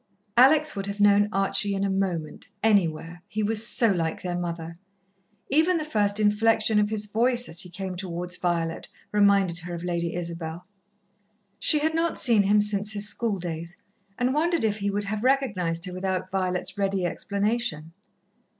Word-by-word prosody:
Alex 295 +5 +5
would 195 0 -4
have 200 +1 -5
known 205 0 +4
Archie 195 0 +2
in 195 - -2
a 200 - 0
moment, 185 -5 -3 0.2
anywhere, 175 -5 +1
he 215 0 -3
was 220 +2 +2
so 230 -2 +3
like 165 -4 -2
their 180 -1 -3
mother. 170 -1 -5 0.8
Even 325 +5 +3
the 310 - -3
first 210 -7 +1
inflection 215 +1 +2
of 210 0 +1
his 215 -1 -1
voice, 240 +3 +1
as 170 - -1
he 180 - -4
came 185 +1 -6
towards 180 -1 -4
Violet, 170 -2 -2 0.2
reminded 200 -4 +3
her 175 +1 -6
of 170 - -7
Lady 170 -1 -2
Isabel. 170 0 -5 0.9
She 305 - +4
had 315 +2 0
not 330 +1 0
seen 230 -5 +5
him 205 +1 +3
since 210 0 0
his 205 0 -2
schooldays, 175 -6 -3 0.4
and 250 +1 0
wondered 335 +1 +1
if 215 -1 -1
he 200 0 -1
would 205 +1 -2
have 210 +2 -4
recognized 200 -11 0
her 180 - -7
without 185 0 -3
Violet's 190 +1 -1
ready 195 -2 0
explanation. 200 -3 -2
200 Hz, 170 wpm, -25 LUFS, 175-215 Hz, 0.9 s, Alex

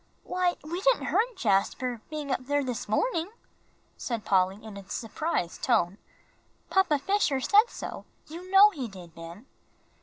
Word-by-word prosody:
"Why, 360 -1 0
we 340 +4 -4
didn't - - +3
hurt 470 +3 +1
Jasper, 225 +3 0
being 300 -2 -4
up 255 0 -2
there 285 0 +1
this 250 -5 -4
morning," 335 - 0 0.7
said 230 -4 -4
Polly, 190 -1 +3
in 220 -2 -9
a 200 -1 -11
surprised 225 - -3
tone; 205 -6 +1 0.7
"Papa 380 -6 +3
Fisher 345 -4 +1
said 420 - +4
so; - - -7 0.2
you 345 +4 -10
know 395 +2 +8
he 275 - -5
did, 180 -5 -12
Ben." 170 +8 -10
270 Hz, 150 wpm, -28 LUFS, -, 0.7 s, know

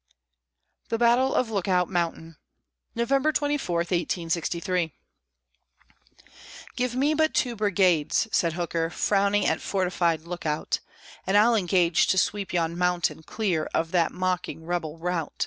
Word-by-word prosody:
THE 230 - 0
BATTLE 240 +3 +3
OF 235 -3 +1
LOOKOUT 185 -3 +1
MOUNTAIN 165 -2 -3 0.6
[November 270 +6 +2
24, 290 - -1
1863] 170 0 -1 1.8
"Give 250 -1 -1
me 285 +4 +2
but 315 0 +1
two 245 -2 +1
brigades," 190 -4 +2
said 170 -2 +1
Hooker, 165 -1 -2
frowning 200 +2 +1
at 160 - +1
fortified 180 -4 0
Lookout; 165 -3 -3 0.5
"And 195 +2 +3
I'll 225 +3 +5
engage 180 -5 +2
to 190 - +2
sweep 200 0 0
yon 170 -1 0
mountain 180 -2 0
clear 175 -3 -2
of 165 0 0
that 170 -2 +2
mocking 180 -3 -3
rebel 165 -2 -3
rout." 170 -1 -3
180 Hz, 125 wpm, -26 LUFS, 170-210 Hz, 1.8 s, I'll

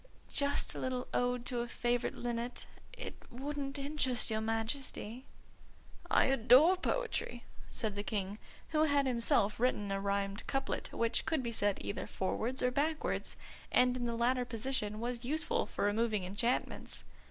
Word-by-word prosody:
"Just 280 0 +1
a - - -5
little 255 -1 -2
ode 245 0 +1
to 245 -1 -2
a 240 - -1
favourite 240 0 0
linnet. 240 0 -3 0.3
It - - -8
wouldn't 275 +2 -4
interest 275 -4 +1
your 220 0 +1
Majesty." 225 +2 -3 0.8
"I - - +5
adore 270 +7 +6
poetry," 370 - -2 0.3
said 220 -2 -2
the 205 - -1
King, 205 0 -3 0.3
who 310 -1 +3
had 285 -2 +3
himself 235 -5 +2
written 210 -5 +1
a 195 0 0
rhymed 200 +1 -1
couplet 270 0 -2
which 230 0 0
could 315 -5 +1
be 235 - -2
said 205 -3 +1
either 200 - -4
forwards 235 +7 -1
or 250 - +3
backwards, 305 +4 -1 0.3
and 250 0 +4
in 245 -1 -1
the 235 - -1
latter 250 +2 +2
position 230 -3 -2
was 240 +1 -3
useful 315 - 0
for - - -1
removing 210 -1 +1
enchantments. 215 +7 -1
245 Hz, 155 wpm, -34 LUFS, 220-270 Hz, 0.8 s, adore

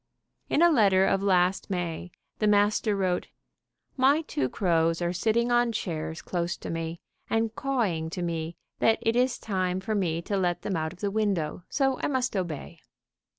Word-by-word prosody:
In 320 - +3
a 345 - +6
letter 195 -8 +4
of 195 0 +2
last 185 -1 +2
May, 175 -2 -3 0.3
the 215 - +2
master 210 +1 +3
wrote: 185 -2 0 0.7
"My 280 +4 +4
two 135 - -2
crows 165 -2 +1
are 175 0 -1
sitting 230 +6 +1
on 240 -1 +3
chairs 160 -6 -4
close 175 -1 -2
to - - -6
me, 165 0 -4 0.3
and 225 0 0
cawing 210 -14 -1
to 180 - -3
me 165 -1 -3 0.2
that 225 - +4
it 225 +1 +1
is 250 0 +2
time 185 -3 -1
for 195 +3 -3
me 175 -6 0
to 200 - -2
let 175 -2 0
them 195 - -2
out 160 -1 -1
of 185 - -15
the 200 -1 -1
window, 195 -6 -1
so 270 -2 +1
I - - 0
must 255 -4 -1
obey." 170 -3 -4
190 Hz, 180 wpm, -27 LUFS, 170-225 Hz, 0.7 s, a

